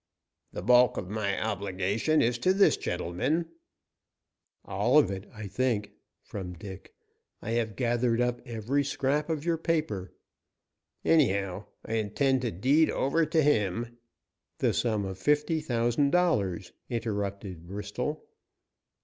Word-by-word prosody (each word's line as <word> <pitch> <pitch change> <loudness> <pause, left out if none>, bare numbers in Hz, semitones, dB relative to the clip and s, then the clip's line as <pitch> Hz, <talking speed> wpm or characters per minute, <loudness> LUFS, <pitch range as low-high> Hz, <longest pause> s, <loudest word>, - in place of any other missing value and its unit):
"The - - -6
bulk 125 +2 +5
of 95 0 -5
my 105 -2 -1
obligation 100 +7 0
is 120 +1 +1
to 185 +8 +2
this 200 - +5
gentleman 110 - -2 0.5
" - - -48
"All 105 +9 +2
of 150 - +5
it, 95 +1 -6
I 105 -2 -8
think," 110 0 -1 0.3
from 90 -3 -6
Dick. 95 +1 -10 0.4
"I 110 - -5
have 115 -3 -1
gathered 120 +1 +1
up 125 0 0
every 120 +3 -1
scrap 140 +2 -1
of 160 -1 -2
your 170 -2 +1
paper." 130 - -1 0.9
"Anyhow, 100 - +2 0.2
I 115 - -1
intend 130 +5 +1
to 120 -3 -1
deed 140 - +3
over 155 +4 +1
to 160 -2 +2
him 115 -2 0 0.3
" - - -57
"The - - +1
sum 110 -4 0
of 95 0 -6
fifty 150 - +2
thousand 120 0 +1
dollars," 105 - +1 0.2
interrupted 100 -6 -4
Bristol. 105 - -4
115 Hz, 135 wpm, -28 LUFS, 100-140 Hz, 0.9 s, bulk